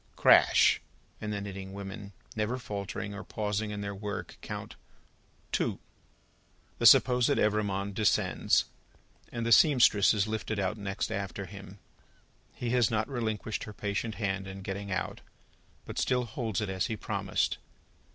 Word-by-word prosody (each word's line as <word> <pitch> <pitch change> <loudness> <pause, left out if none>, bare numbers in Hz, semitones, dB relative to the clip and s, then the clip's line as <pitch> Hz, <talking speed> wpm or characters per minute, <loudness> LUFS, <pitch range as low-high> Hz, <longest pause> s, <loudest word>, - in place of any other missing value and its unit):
Crash! - - +6 0.4
And 105 - -3
the 105 - -2
knitting 95 -1 -7
women, 100 +1 -7 0.2
never 110 +3 -1
faltering 100 -3 -5
or 100 - -7
pausing 105 0 -2
in 105 -1 -4
their 100 0 -4
Work, 100 +1 -6
count - - -6 0.8
Two. - - 0 1.0
The - - +6
supposed 125 -2 +6
Evrémonde 100 -2 +1
descends, 105 0 +2 0.7
and 115 -1 -3
the 115 - 0
seamstress 120 -7 +6
is 100 -2 +2
lifted 110 0 -3
out 100 +1 0
next 100 +1 -3
after 100 -1 -4
him. 100 +1 -11 0.8
He 120 -1 -3
has 120 -3 +3
not 110 -1 0
relinquished 110 -4 -3
her 105 - -8
patient 105 +2 -3
hand 95 -2 -2
in 95 0 -8
getting 100 +1 -5
out, 95 - -3 0.6
but - - -5
still 125 -1 +1
holds 110 -3 -3
it 105 - -2
as 95 -1 -1
he 110 - -3
promised. - - -1
105 Hz, 145 wpm, -30 LUFS, 100-110 Hz, 1.0 s, Crash